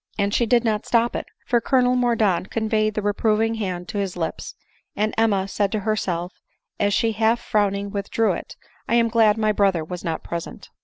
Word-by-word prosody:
And 200 -1 0
she 235 - +2
did 235 0 +3 0.2
stop 235 0 +1
it; - - -4 0.2
for 240 -1 +2
Colonel 250 -1 +2
Mordaunt 225 -7 +1
conveyed 215 -1 0
the 215 - -2
reproving 215 +2 +1
hand 180 -3 -3
to 205 - -3
his 195 -3 -3
lips; 165 -2 -4 0.4
and 215 +1 0
Emma 205 -4 +2
said 200 0 -1
to 215 - -1
herself, 185 -4 -2 0.5
as 205 0 +2
she 225 +2 +2
half 225 +2 +2
frowning 200 -3 0
withdrew 205 +1 0
it, 175 - -6 0.2
" - - -34
I 235 - +3
am 230 -1 +3
glad 220 -2 +4
my 215 -1 +2
brother 195 -5 +2
was 180 +2 -7
not 165 -1 -3
present." 170 -1 -7
215 Hz, 195 wpm, -23 LUFS, 195-225 Hz, 0.5 s, glad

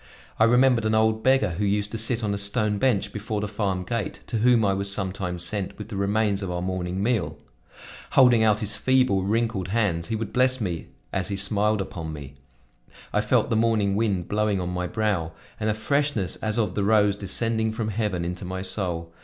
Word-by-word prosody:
I 110 - +6
remembered 125 -1 +4
an 110 0 +2
old 110 0 +2
beggar 130 -5 +3
who - - 0
used 105 +1 0
to 115 - -3
sit 115 +1 0
on 105 -1 0
a - - -2
stone 100 +1 +1
bench 105 -5 +1
before 105 0 -3
the 105 - -2
farm 100 -3 -2
gate, 115 0 -4
to 115 - -3
whom 120 -1 +4
I 100 - +2
was 100 0 -1
sometimes 95 -3 -2
sent 95 +2 -2
with 105 +1 -8
the 105 - -6
remains 100 +1 0
of 95 - -4
our 90 0 -3
morning 95 +1 -3
meal. 100 -10 0 0.8
Holding 125 -4 +6
out 105 -1 +3
his 105 0 -3
feeble, 130 -7 +2
wrinkled 105 -1 -1
hands 95 -5 0
he 115 - -2
would 110 0 -5
bless 130 +1 +3
me 90 -7 -3 0.3
as 95 -2 0
he 100 - -3
smiled 105 +1 +1
upon 80 -4 -6
me. 70 -2 -9 0.8
I 105 - +2
felt 115 +3 +1
the - - +2
morning 110 -3 +2
wind 100 -5 0
blowing 105 -1 0
on 90 -1 -3
my 90 0 -2
brow 95 -6 -1 0.3
and 110 0 0
a 105 - 0
freshness 140 -4 0
as 110 +1 -2
of 110 -2 0
the 100 - -1
rose 105 -1 +3
descending 110 +3 0
from 110 0 -3
heaven 100 -5 -2
into 90 +2 -5
my 95 +1 -4
soul. 85 -4 -3
105 Hz, 210 wpm, -25 LUFS, 95-110 Hz, 0.8 s, I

